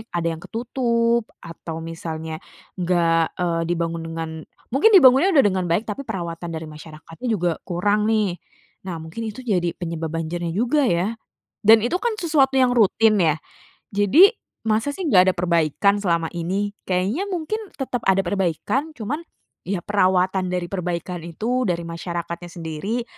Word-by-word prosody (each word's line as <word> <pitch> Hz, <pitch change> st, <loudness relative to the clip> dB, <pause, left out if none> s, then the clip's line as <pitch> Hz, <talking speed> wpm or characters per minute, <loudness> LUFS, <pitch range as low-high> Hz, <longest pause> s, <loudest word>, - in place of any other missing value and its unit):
Ada 170 Hz, -1 st, 0 dB
yang -, -, -12 dB
ketutup 235 Hz, -1 st, 0 dB, 0.2 s
atau 165 Hz, -1 st, -7 dB
misalnya 160 Hz, -1 st, -5 dB, 0.4 s
enggak, 170 Hz, -2 st, +2 dB
eee, 170 Hz, -2 st, 0 dB
dibangun 170 Hz, -1 st, -1 dB
dengan 165 Hz, 0 st, -4 dB, 0.4 s
mungkin 290 Hz, -, +5 dB
dibangunnya 270 Hz, +1 st, +7 dB
udah 275 Hz, -, +7 dB
dengan 190 Hz, -2 st, 0 dB
baik, 175 Hz, +6 st, +1 dB
tapi 210 Hz, +6 st, -4 dB
perawatan 175 Hz, -5 st, -5 dB
dari 160 Hz, 0 st, -5 dB
masyarakatnya 155 Hz, +8 st, -9 dB
juga 175 Hz, -6 st, 0 dB
kurang 205 Hz, +4 st, +1 dB
nih. 210 Hz, -5 st, +1 dB, 0.5 s
Nah, 175 Hz, -, -3 dB
mungkin 160 Hz, +7 st, -8 dB
itu 220 Hz, +4 st, -8 dB
jadi 180 Hz, -7 st, 0 dB
penyebab 165 Hz, -2 st, -4 dB
banjirnya 165 Hz, +1 st, -3 dB
juga 250 Hz, +8 st, +2 dB
ya, 180 Hz, +1 st, +1 dB, 0.5 s
dan 220 Hz, +2 st, +8 dB
itu 245 Hz, -, -2 dB
kan 470 Hz, -1 st, 0 dB
sesuatu 285 Hz, -6 st, +2 dB
yang 255 Hz, -1 st, +4 dB
rutin 220 Hz, -1 st, +4 dB
ya. 160 Hz, -2 st, +3 dB, 0.6 s
Jadi, 245 Hz, -, +6 dB, 0.3 s
masa 220 Hz, +5 st, +1 dB
sih 380 Hz, -, -4 dB
nggak 185 Hz, -8 st, +5 dB
ada -, -, -17 dB
perbaikan 170 Hz, +3 st, +2 dB
selama 170 Hz, -4 st, +1 dB
ini? 190 Hz, +4 st, -2 dB, 0.2 s
Kayaknya 195 Hz, -, 0 dB
mungkin 365 Hz, +4 st, -2 dB, 0.2 s
tetep 260 Hz, -3 st, -3 dB
ada 190 Hz, 0 st, +5 dB
perbaikan, 200 Hz, -, -1 dB
cuman, 250 Hz, +7 st, -3 dB, 0.5 s
ya 195 Hz, -2 st, -1 dB
perawatan 185 Hz, -1 st, +2 dB
dari 180 Hz, -1 st, -1 dB
perbaikan 180 Hz, -1 st, -3 dB
itu, 240 Hz, +9 st, -1 dB
dari 170 Hz, -1 st, -1 dB
masyarakatnya 170 Hz, +1 st, -5 dB
sendiri, 175 Hz, +8 st, -4 dB
185 Hz, 150 wpm, -22 LUFS, 170-230 Hz, 0.6 s, dan